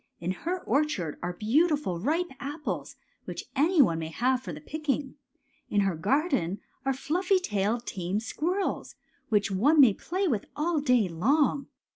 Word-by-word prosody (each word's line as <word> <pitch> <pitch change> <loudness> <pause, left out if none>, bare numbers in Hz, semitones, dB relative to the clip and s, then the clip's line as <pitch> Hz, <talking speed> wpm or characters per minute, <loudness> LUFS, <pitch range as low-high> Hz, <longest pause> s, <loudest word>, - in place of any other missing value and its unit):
In 170 +2 -2
her 350 - -3
orchard 240 - 0
are 180 0 -3
beautiful 255 - +1
ripe 320 - 0
apples, 295 +2 -4 0.3
which - - -6
any 305 +3 +5
one 165 -8 0
may 160 - -3
have 250 +10 +1
for 185 - -6
the 150 - -7
picking. 285 - -3 0.6
In 205 - +2
her 195 -3 +1
garden 205 - 0 0.3
are - - +4
fluffy 355 +9 +1
tailed, 225 - -1
tame 185 +2 -2
squirrels, 350 - -2 0.3
which 205 -3 +2
one 280 +12 +3
may 255 -7 +8
play 370 - -2
with 230 - 0
all 320 +1 0
day 250 -7 +3
long. 270 - +1
265 Hz, 155 wpm, -28 LUFS, 195-310 Hz, 0.6 s, may